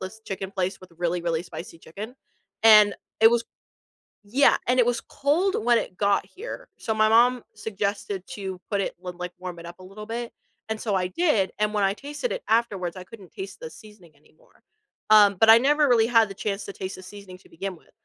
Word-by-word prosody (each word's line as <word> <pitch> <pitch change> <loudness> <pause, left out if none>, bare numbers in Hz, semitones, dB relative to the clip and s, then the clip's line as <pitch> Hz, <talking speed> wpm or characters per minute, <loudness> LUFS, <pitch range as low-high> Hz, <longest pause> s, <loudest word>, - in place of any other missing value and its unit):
this 190 +4 -8
chicken 195 -1 -5
place 190 0 -3
with 185 -1 -14
really, 175 0 -1
really 170 -1 -1
spicy 170 -1 -10
chicken, 210 +10 -9 0.5
and 210 -2 +7 0.3
it 225 - +8
was 235 0 +1 0.8
Yeah, 255 +8 +4
and 255 +1 +2
it 240 - +3
was 240 -1 0
cold 335 +8 0
when 240 -1 +4
it 180 - -5
got 200 0 +1
here, 445 +6 -9
so, 220 - -2
my 215 0 +3
mom 240 +2 +4
suggested 200 -2 -3
to 190 -2 -5
put 200 - 0
it - - -4
l 180 - -4
like 180 0 -5
warm 180 -1 -7
it 170 - -10
up 175 +1 -10
a 185 - -12
little 210 +3 -10
bit, 235 +1 -5 0.4
and 220 - -3
so 210 -3 -1
I 180 -1 0
did, 225 - +1
and 210 0 0
when 205 - +1
I 195 - +2
tasted 295 - -5
it - - -5
afterwards, 200 -6 0
I 185 - -7
couldn't 200 -3 -14
taste 385 0 -8
the 480 - -6
seasoning 210 -7 -16
anymore, - - -28 0.5
um, 205 -2 +7
but 225 - +7
I 225 - +9
never 295 +4 +3
really 230 -3 +4
had 230 -3 +4
the 195 - -8
chance 200 0 -3
to - - -6
taste 190 0 -6
the 185 - -12
seasoning 190 -1 -11
to - - -21
begin 185 +2 -6
with. - - -24
210 Hz, 220 wpm, -25 LUFS, 185-235 Hz, 0.8 s, I